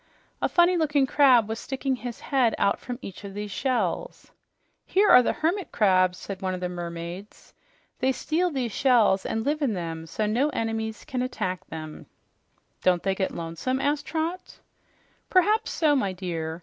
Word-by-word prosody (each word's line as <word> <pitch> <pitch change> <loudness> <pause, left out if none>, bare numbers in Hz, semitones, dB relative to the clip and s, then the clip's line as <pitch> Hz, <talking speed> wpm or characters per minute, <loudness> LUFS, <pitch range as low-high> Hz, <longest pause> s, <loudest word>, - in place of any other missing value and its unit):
A - - +1
funny 350 +1 +4
looking 295 -4 +2
crab 260 -5 +5
was 220 +1 -4
sticking 270 -1 -2
his 245 -1 -7
head 250 -5 +2
out 200 - +1
from 245 -1 -6
each 195 - -8
of 200 -1 -8
these 205 0 -5
shells. 260 - -2 0.6
"These 395 +3 +4
are 250 - +8
the - - +1
hermit 350 +4 -1
crabs," 185 -4 +3
said 195 -1 -7
one 185 -1 -1
of - - -6
the 180 0 -3
mermaids. 175 +2 -7 0.5
"They 260 0 +2
steal 325 +7 0
these 260 -7 -2
shells 220 -6 +3
and 225 0 -2
live 300 +2 0
in 265 -6 +1
them 165 -2 -5
so 215 +6 -2
no 240 +8 +1
enemies 225 -4 -3
can 260 -4 -3
attack 210 -8 -3
them." 155 -1 -8 0.7
"Don't 180 -2 +2
they 195 - +1
get 190 0 -1
lonesome?" 170 +11 -3
asked 290 +1 -1
Trot. 335 +3 -3 0.7
"Perhaps 420 +5 +3
so, 305 -3 +2
my 200 -8 0
dear. 165 -3 -4
225 Hz, 175 wpm, -26 LUFS, 185-280 Hz, 0.7 s, are